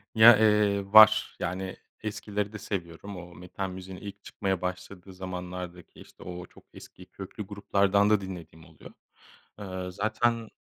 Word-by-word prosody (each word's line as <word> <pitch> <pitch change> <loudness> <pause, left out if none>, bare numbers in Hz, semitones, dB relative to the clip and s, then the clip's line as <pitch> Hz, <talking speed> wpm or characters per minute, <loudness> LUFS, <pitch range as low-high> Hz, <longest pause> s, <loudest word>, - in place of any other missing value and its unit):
Ya, 110 0 +9
eee, 105 -2 +2
var 110 0 +8
yani, 95 +1 -4 0.3
eskileri 105 -1 -3
de 105 - -5
seviyorum. 95 0 -6
O 90 -1 -11
metal 90 +2 -5
müziğin 95 0 -8
ilk 100 +1 -10
çıkmaya 95 -3 -2
başladığı 90 +1 -6
zamanlardaki, 90 -1 -7
işte - - -15
o 90 0 -7
çok - - -19
eski, 90 - -13
köklü 95 +3 -8
gruplardan 100 0 +2
da 105 -1 +3
dinlediğim 85 -4 -9
oluyor. 80 -1 -15 0.7
Eee, 95 -2 -5
zaten 110 +3 0
95 Hz, 140 wpm, -28 LUFS, 90-105 Hz, 0.7 s, Ya